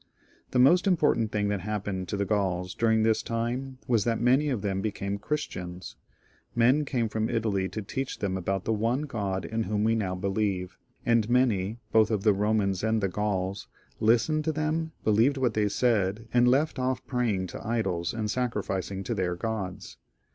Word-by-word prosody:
The -, -, -1 dB
most 175 Hz, +10 st, +5 dB
important 150 Hz, -, +2 dB
thing 105 Hz, -1 st, 0 dB
that 100 Hz, -2 st, -1 dB
happened 100 Hz, -2 st, -3 dB
to 100 Hz, -, -3 dB
the 100 Hz, -, 0 dB
Gauls 95 Hz, -3 st, -1 dB
dur 115 Hz, -, +1 dB
ing 110 Hz, 0 st, +3 dB
this 110 Hz, 0 st, +2 dB
time 125 Hz, +3 st, -3 dB
was 115 Hz, -4 st, +3 dB
that 115 Hz, 0 st, 0 dB
many 130 Hz, +5 st, +3 dB
of 125 Hz, -7 st, -2 dB
them 95 Hz, -1 st, -1 dB
became 100 Hz, -1 st, -3 dB
Christians. 90 Hz, -9 st, -4 dB, 0.6 s
Men 125 Hz, +6 st, +4 dB
came 120 Hz, -4 st, 0 dB
from 110 Hz, +1 st, -1 dB
Italy 100 Hz, -4 st, 0 dB
to 110 Hz, -, -5 dB
teach 135 Hz, +6 st, -4 dB
them 95 Hz, -2 st, -2 dB
about 95 Hz, +1 st, -2 dB
the 110 Hz, -, +1 dB
one 115 Hz, +6 st, 0 dB
God 100 Hz, -9 st, -3 dB
in 115 Hz, 0 st, -2 dB
whom 105 Hz, +1 st, 0 dB
we 110 Hz, +1 st, +3 dB
now 100 Hz, -5 st, -1 dB
believe, 95 Hz, -1 st, -1 dB, 0.3 s
and 115 Hz, -2 st, +3 dB
many, 115 Hz, -5 st, +2 dB
both 110 Hz, -1 st, +5 dB
of 105 Hz, -3 st, -1 dB
the 105 Hz, -, +5 dB
Eomans 100 Hz, -2 st, +1 dB
and 110 Hz, 0 st, +2 dB
the 100 Hz, -2 st, 0 dB
Gauls, 95 Hz, 0 st, -2 dB, 0.3 s
listened 120 Hz, +8 st, +3 dB
to 160 Hz, -, +2 dB
them, 155 Hz, +1 st, -1 dB
believed 115 Hz, +6 st, +3 dB
what 125 Hz, -4 st, +1 dB
they 105 Hz, -1 st, +1 dB
said, 110 Hz, -2 st, +1 dB
and 120 Hz, 0 st, +5 dB
left 140 Hz, +3 st, +2 dB
off 130 Hz, 0 st, -1 dB
praying 115 Hz, -7 st, 0 dB
to -, -, -7 dB
idols 95 Hz, -7 st, -1 dB
and 110 Hz, -2 st, -3 dB
sacrificmg 100 Hz, -5 st, -2 dB
to 120 Hz, -, -1 dB
their 90 Hz, -4 st, -1 dB
gods. 100 Hz, -2 st, -5 dB
110 Hz, 185 wpm, -28 LUFS, 100-120 Hz, 0.6 s, most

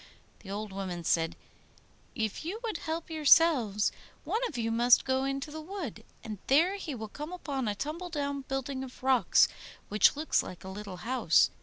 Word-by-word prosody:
The 195 Hz, -, -13 dB
old 205 Hz, 0 st, -4 dB
woman 185 Hz, -3 st, -4 dB
said, 165 Hz, 0 st, +1 dB, 0.8 s
'If 220 Hz, +1 st, -2 dB
you 370 Hz, +7 st, -4 dB
would 445 Hz, -8 st, -2 dB
help 325 Hz, +1 st, -4 dB
yourselves, 290 Hz, -9 st, +4 dB, 0.3 s
one 450 Hz, -, -1 dB
of 295 Hz, -, -7 dB
you 225 Hz, -1 st, -1 dB
must 240 Hz, +2 st, +5 dB
go 265 Hz, 0 st, +1 dB
into 275 Hz, +2 st, -3 dB
the 315 Hz, +1 st, -6 dB
wood, 310 Hz, -, -6 dB, 0.2 s
and 215 Hz, -4 st, -6 dB
there 335 Hz, +9 st, +4 dB
he 315 Hz, -8 st, -5 dB
will 220 Hz, -2 st, -6 dB
come 300 Hz, +9 st, -7 dB
upon 280 Hz, -8 st, -3 dB
a 205 Hz, -, -1 dB
tumble 315 Hz, -, -4 dB
down 285 Hz, -3 st, -2 dB
building 270 Hz, 0 st, -3 dB
of 255 Hz, -1 st, -11 dB
rocks 260 Hz, -2 st, +5 dB, 0.4 s
which 210 Hz, +6 st, +5 dB
looks 310 Hz, +2 st, +1 dB
like 180 Hz, -, -9 dB
a 190 Hz, -, -7 dB
little 195 Hz, -1 st, -7 dB
house. 235 Hz, -10 st, +4 dB
265 Hz, 180 wpm, -30 LUFS, 215-315 Hz, 0.8 s, must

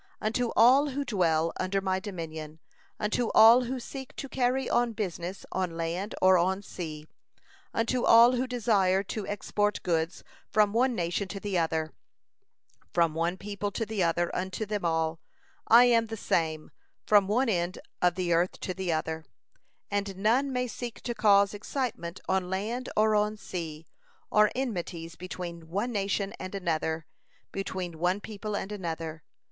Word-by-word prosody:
Unto 230 Hz, +3 st, 0 dB
all 260 Hz, +6 st, +6 dB
who 280 Hz, +1 st, -3 dB
dwell 165 Hz, -7 st, +1 dB
under 185 Hz, +1 st, 0 dB
my 190 Hz, -1 st, 0 dB
dominion, 160 Hz, -6 st, -7 dB, 0.4 s
unto 220 Hz, +2 st, 0 dB
all 230 Hz, +3 st, +8 dB
who 255 Hz, +2 st, -3 dB
seek 265 Hz, +1 st, -8 dB
to 275 Hz, -, -5 dB
carry 260 Hz, 0 st, 0 dB
on 240 Hz, -1 st, +1 dB
business 185 Hz, -3 st, -4 dB
on 180 Hz, -3 st, -2 dB
land 170 Hz, +5 st, -3 dB
or 185 Hz, -1 st, +7 dB
on 190 Hz, +3 st, 0 dB
sea, 155 Hz, -5 st, -7 dB, 0.7 s
unto 235 Hz, +2 st, 0 dB
all 235 Hz, +2 st, +8 dB
who 255 Hz, +1 st, 0 dB
desire 205 Hz, -6 st, +2 dB
to 205 Hz, +1 st, -5 dB
export 205 Hz, +1 st, -1 dB
goods 165 Hz, -1 st, -1 dB, 0.3 s
from 210 Hz, -1 st, +3 dB
one 250 Hz, +2 st, +2 dB
nation 175 Hz, +2 st, -1 dB
to 195 Hz, +1 st, -6 dB
the 205 Hz, -1 st, -3 dB
other, 160 Hz, -2 st, 0 dB, 1.0 s
from 165 Hz, -, +2 dB
one 170 Hz, +3 st, -1 dB
people 205 Hz, +1 st, -4 dB
to 225 Hz, +3 st, -3 dB
the 215 Hz, -2 st, -2 dB
other 175 Hz, 0 st, +1 dB
unto 190 Hz, +4 st, -3 dB
them 210 Hz, -2 st, -3 dB
all, 160 Hz, -1 st, 0 dB, 0.5 s
I 235 Hz, +2 st, +8 dB
am 230 Hz, -2 st, +4 dB
the 225 Hz, 0 st, -5 dB
same, 160 Hz, -5 st, -1 dB, 0.3 s
from 205 Hz, -2 st, +5 dB
one 245 Hz, +6 st, +2 dB
end 175 Hz, -3 st, 0 dB, 0.2 s
of 180 Hz, -1 st, +3 dB
the 175 Hz, -2 st, 0 dB
earth 175 Hz, +2 st, +1 dB
to 185 Hz, -, -3 dB
the 185 Hz, -2 st, -2 dB
other, 160 Hz, 0 st, -2 dB, 0.7 s
and 200 Hz, -1 st, -2 dB
none 240 Hz, +8 st, +2 dB
may 250 Hz, -1 st, 0 dB
seek 240 Hz, -1 st, -6 dB
to 240 Hz, -, -3 dB
cause 200 Hz, -2 st, +4 dB
excitement 210 Hz, -5 st, -4 dB
on 190 Hz, -1 st, 0 dB
land 220 Hz, +7 st, -3 dB
or 215 Hz, 0 st, +4 dB
on 210 Hz, 0 st, +1 dB
sea, 165 Hz, -5 st, -6 dB, 0.5 s
or 210 Hz, 0 st, +5 dB
enmities 175 Hz, -9 st, -4 dB
between 170 Hz, -2 st, -7 dB
one 205 Hz, +8 st, -1 dB
nation 200 Hz, -1 st, -1 dB
and 185 Hz, +1 st, -6 dB
another, 160 Hz, -3 st, -1 dB, 0.5 s
between 185 Hz, -4 st, -4 dB
one 180 Hz, +3 st, +1 dB
people 210 Hz, 0 st, -5 dB
and 205 Hz, -, -4 dB
another. 165 Hz, -5 st, -5 dB
195 Hz, 160 wpm, -28 LUFS, 170-220 Hz, 1.0 s, all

